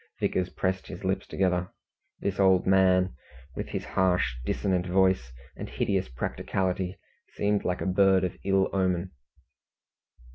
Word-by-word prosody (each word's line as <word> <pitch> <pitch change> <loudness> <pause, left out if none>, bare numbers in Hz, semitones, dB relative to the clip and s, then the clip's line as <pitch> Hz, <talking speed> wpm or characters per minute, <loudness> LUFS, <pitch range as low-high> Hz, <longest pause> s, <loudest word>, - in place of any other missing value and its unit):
Vickers 90 -1 0
pressed 95 0 -2
his 90 -1 -8
lips 95 0 -1
together. 90 -1 0 0.5
This 100 -1 -2
old 95 -2 +4
man, 95 -1 +4 0.4
with - - -4
his - - -4
harsh, 90 -8 +1
dissonant 90 +6 0
voice, 95 -9 +2 0.2
and - - -7
hideous 80 +6 -1
practicality, 90 +8 -2 0.4
seemed 105 0 +1
like 90 0 -1
a - - -2
bird 95 0 +4
of 90 - -2
ill 95 -1 +2
omen. 95 -1 0
95 Hz, 135 wpm, -27 LUFS, 90-95 Hz, 0.5 s, old